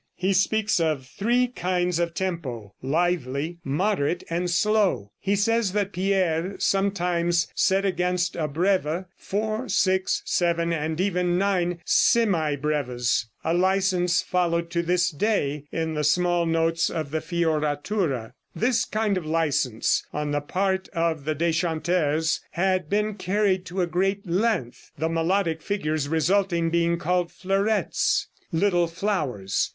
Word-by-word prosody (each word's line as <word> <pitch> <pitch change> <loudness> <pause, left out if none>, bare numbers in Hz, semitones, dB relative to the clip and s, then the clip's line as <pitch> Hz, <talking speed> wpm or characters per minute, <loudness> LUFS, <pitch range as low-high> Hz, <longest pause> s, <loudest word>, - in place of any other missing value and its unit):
He 190 +1 0
speaks 210 +2 +2
of 155 -5 0
three 240 - +1
kinds 180 -5 -1
of 170 -1 -1
tempo 140 - -4
lively, 160 +1 -1
moderate 170 +2 0
and 175 +1 -1
slow. 195 - +1
He 200 +1 0
says 215 -1 +1
that 205 -1 -1
Pierre 185 -1 0
sometimes 175 -3 +1
set 195 +1 +2
against 180 -1 0
a 160 -3 -1
breve 175 +2 0
four, 215 +4 -3
six, 190 -1 +1
seven 170 -1 +1
and 160 0 -2
even 180 -2 +1
nine 180 -3 0
semibreves 150 - +1 0.2
a 165 - 0
license 185 -1 +2
followed 170 -2 0
to 170 0 +1
this 180 +1 +1
day 150 -5 -1
in 160 -1 -2
the 150 -1 -1
small 175 +2 +2
notes 165 0 +1
of 155 -4 -4
the 160 - 0
fioratura. 155 - -1 0.2
This 240 0 +1
kind 215 -4 0
of 170 - -10
license 150 -8 +1
on 150 0 -3
the 145 0 0
part 190 +5 -1
of 165 -4 -1
the 155 0 -1
deschanteurs 160 -1 0
had 185 -2 0
been 210 +1 +1
carried 190 -1 0
to 185 +1 -2
a - - +2
great 190 +3 -1
length, 180 - -1
the 160 +3 -1
melodic 165 0 0
figures 155 -7 -2
resulting 170 +1 +1
being 170 0 +2
called 175 +1 0
"fleurettes" 195 +3 0 0.3
("little 175 0 +2
flowers"). 150 - -1
175 Hz, 135 wpm, -25 LUFS, 160-195 Hz, 0.3 s, speaks